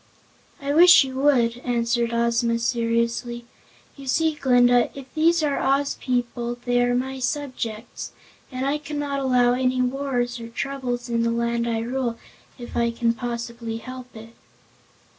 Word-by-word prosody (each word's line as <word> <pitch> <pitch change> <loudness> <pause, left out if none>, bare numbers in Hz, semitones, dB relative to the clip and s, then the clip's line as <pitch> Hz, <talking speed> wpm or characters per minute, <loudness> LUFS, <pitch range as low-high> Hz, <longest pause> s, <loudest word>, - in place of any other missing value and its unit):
"I 280 0 -2
wish 350 +1 +8
you 265 -1 -6
would," 245 -4 +3
answered 235 -1 0
Ozma 235 0 +1
seriously. 235 0 -1 0.5
"You 275 -1 -11
see, 320 +4 +2
Glinda, 245 -4 +4
if 270 - -7
these 330 +1 +3
are 285 -2 0
Oz 275 +1 +1
people 240 -1 -2
they 245 0 +2
are 245 0 +2
my 265 +1 -2
subjects 250 -5 -4 0.4
and 255 0 -3
I 285 +2 0
cannot 290 -1 -3
allow 250 -2 +3
any 255 0 0
wars 250 -1 -1
or 230 - -7
troubles 245 0 -4
in 235 -1 0
the 230 - +1
Land 235 0 0
I 225 -1 -1
rule, 240 0 -2 0.4
if 240 -2 -9
I 235 0 +2
can 230 0 0
possibly 235 -1 -5
help 255 +1 -10
it." 225 +1 -11
245 Hz, 150 wpm, -23 LUFS, 235-270 Hz, 0.5 s, wish